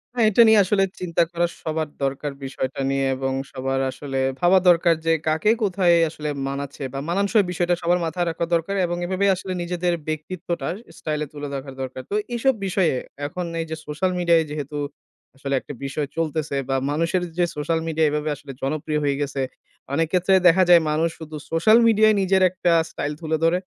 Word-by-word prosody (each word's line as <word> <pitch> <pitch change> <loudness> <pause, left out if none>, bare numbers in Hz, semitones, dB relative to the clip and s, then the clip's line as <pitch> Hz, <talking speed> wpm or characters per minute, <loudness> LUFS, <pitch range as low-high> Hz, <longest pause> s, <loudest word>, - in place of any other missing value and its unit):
হ্যাঁ, 230 -2 +3
এটা 225 +3 +5
নিয়ে 220 -1 +6
আসলে 195 +1 +2 0.2
চিন্তা 170 -1 +1
করা 175 0 +1 0.2
সবার 155 -1 -2
দরকার 140 +2 -2
বিষয়টা 130 0 -4
নিয়ে 135 0 0
এবং 135 0 -2 0.2
সবার 135 0 -2
আসলে 135 0 -4 0.2
ভাবা 180 +2 +5
দরকার 170 -1 +4
যে 165 - +4
কাকে 160 +8 +3
কোথায় 180 -3 +3
আসলে 150 -1 -5 0.2
মানাচ্ছে, 140 0 -5
বা 135 - -3
মানানসই 200 +3 +2
বিষয়টা 175 0 +1
সবার 175 +1 +2
মাথায় 175 +2 -1
রাখা 165 +1 -2
দরকার 170 +4 0
এবং 175 0 -3
এভাবে 190 +2 0
আসলে 185 0 -5
নিজেদের 175 0 -1
ব্যক্তিত্বটা 170 +3 -4 0.3
স্টাইল 150 -1 -3
এ - - -14
তুলে 145 0 -6
দেখার 135 -1 -6
দরকার। 130 0 -5
তো 205 - -2 0.2
এইসব 265 +3 +2
বিষয়ে 185 -5 +1 0.3
এখন 180 +3 -5 0.2
এই - - -3
যে 160 - -3
সোশ্যাল 170 +5 -1
মিডিয়ায় 170 -2 +4
যেহেতু 150 0 -5 0.6
আসলে 140 0 -4
একটা 145 - -9
বিষয় 140 +1 -2
চলতেছে 155 -3 -1
বা 135 - +1 0.2
মানুষের 165 +4 0 0.2
যে 175 - +3
সোশ্যাল 160 +2 -1
মিডিয়া 160 0 +1
এভাবে 150 +1 -2
আসলে 140 0 -10
জনপ্রিয় 150 +2 -1
হয়ে 140 -1 +1
গেছে, 140 -1 -2 0.5
অনেক 165 +2 +2
ক্ষেত্রে 185 +1 +3
দেখা 185 +2 +6
যায় 170 -1 +8
মানুষ 160 +2 +1
শুধু 155 -1 -8 0.2
সোশ্যাল 190 +8 +5
মিডিয়ায় 215 -1 +5
নিজের 190 0 +2
একটা 180 -1 0 0.2
স্টাইল 150 +1 -3
তুলে 160 0 -1
ধরে। 165 +2 +4
165 Hz, 185 wpm, -23 LUFS, 145-180 Hz, 0.6 s, যায়